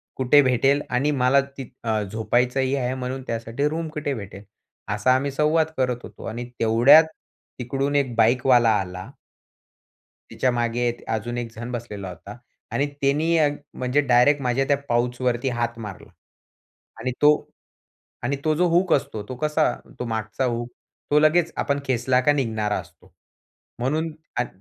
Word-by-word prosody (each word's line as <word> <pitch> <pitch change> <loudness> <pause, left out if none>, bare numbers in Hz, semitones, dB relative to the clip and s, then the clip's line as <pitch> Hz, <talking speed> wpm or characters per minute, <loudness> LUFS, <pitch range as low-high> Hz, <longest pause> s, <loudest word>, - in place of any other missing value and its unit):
कुठे 130 +3 +5
भेटेल 135 +2 +2
आणि 130 +4 +1
मला 135 0 +3 0.2
ति 135 -3 -7
अ, 110 -2 0
झोपायचंही 125 +6 0
आहे 130 -2 -1
म्हणून 130 0 -4
त्यासाठी 115 +5 -2
रूम 160 +1 -3
कुठे 150 -2 -3
भेटेल? 100 -4 -8 0.5
असा 125 +5 +3
आम्ही 140 +1 -1
संवाद 155 +3 +2
करत 125 -2 0
होतो - - -11
आणि 120 +2 -5
तेवढ्यात 120 +8 +7 0.6
तिकडून 135 +3 -2
एक 130 -5 +1
बाईकवाला 120 +1 +4
आला 90 -1 -6 1.2
तिच्यामागे 120 -1 0 0.2
अजून 120 +2 -3
एकजण 115 0 -6
बसलेला 105 -5 -6
होता. 100 +4 -10 0.4
आणि 140 - +1
त्यांनी 150 +5 +2
अ, 155 -2 +4 0.3
म्हणजे 125 +3 +1
डायरेक्ट 135 +2 +3
माझ्या 125 +1 +1
त्या 140 - +4
पाउचवरती 120 +1 0
हात 120 0 -2
मारला. 105 -4 -9 0.9
आणि 130 - -2
तो 150 - +8 0.9
आणि 130 +4 -1
तो 155 -1 +2
जो 180 - +3
हूक 175 +1 +2
असतो 110 -6 0
तो 130 - -5
कसा? 150 +3 +1 0.3
तो - - -3
मागचा 110 +2 -3
हूक, 120 -1 -2 0.4
तो 150 - +5
लगेच 160 +2 +3
आपण 140 -1 0
खेचला 125 0 +2
का 145 +3 +3
निघणारा 110 -7 -1
असतो. - - -13 0.7
म्हणून 155 +7 -1 0.3
अग 125 - +1
125 Hz, 145 wpm, -23 LUFS, 120-140 Hz, 1.2 s, तो